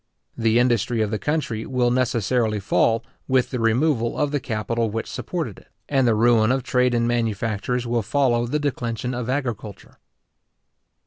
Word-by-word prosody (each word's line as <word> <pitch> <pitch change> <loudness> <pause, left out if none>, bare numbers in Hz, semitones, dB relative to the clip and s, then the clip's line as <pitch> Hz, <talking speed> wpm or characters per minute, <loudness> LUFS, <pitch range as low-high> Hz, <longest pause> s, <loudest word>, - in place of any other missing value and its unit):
The 115 -1 +2
industry 120 -2 +2
of 105 - -3
the 110 - -1
country 145 -8 -2
will 125 -2 +1
necessarily 120 -3 +1
fall 115 +3 +1 0.2
with 130 -1 +2
the 125 - -2
removal 120 +1 +1
of 145 -1 0
the 145 - 0
capital 115 -1 -2
which 115 +2 -3
supported 130 - -4
it, - - -23 0.2
and 135 -3 +2
the 115 - +3
ruin 115 0 +4
of 130 -1 0
trade 125 0 +2
and 120 0 +1
manufactures 115 +1 -1
will 120 0 0
follow 120 +1 +1
the 145 +5 0
declension 125 -4 -2
of 125 0 -4
agriculture. 120 -7 -4
120 Hz, 165 wpm, -23 LUFS, 115-130 Hz, 0.2 s, ruin